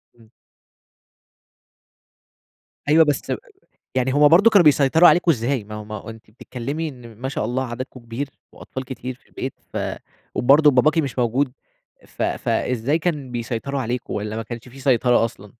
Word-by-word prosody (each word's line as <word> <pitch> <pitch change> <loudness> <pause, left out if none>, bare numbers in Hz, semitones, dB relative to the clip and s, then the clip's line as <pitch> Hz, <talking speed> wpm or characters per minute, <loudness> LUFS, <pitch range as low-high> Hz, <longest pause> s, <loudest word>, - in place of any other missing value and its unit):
إمم. 115 -2 -21 2.6
أيوه 160 +2 +6
بس، 145 -2 -1 0.6
يعني 130 0 +1
هُم 145 +1 +6
برضه 190 +8 +6
كانوا 200 -6 +6
بيسيطروا 150 +3 +6
عليكم 175 -1 +4
إزاي؟ 125 -4 0
ما 105 - -9
هو 105 0 -7
ما 110 - -8
هو 105 +1 -7
أنتِ 110 -1 -14
بتتكلّمي 135 +7 -5
إن 125 -5 -12
ما 130 +4 -4
شاء 135 - -2
الله 125 +4 -1
عددكم 130 +2 -7
كبير، 120 +4 -5 0.2
وأطفال 130 0 -8
كتير 130 0 -6
في 125 - -29
البيت، 130 - -5 0.2
ف - - -6 0.6
وبرضه 145 +4 +5
باباكِ 150 +5 +3
مش 135 -5 -1
موجود 125 +3 +1 0.5
ف - - -7
فإزاي 125 +6 0
كان 150 -6 -2
بيسيطروا 120 +3 -3
عليكم؟ 125 0 -3
والَّا 105 +1 -3
ما 115 - -3
كانش 120 +2 -8
في 135 +2 -13
سيطرة 125 -2 +3
أصلًا؟ 105 -3 -7
130 Hz, 160 wpm, -22 LUFS, 115-145 Hz, 2.6 s, أيوه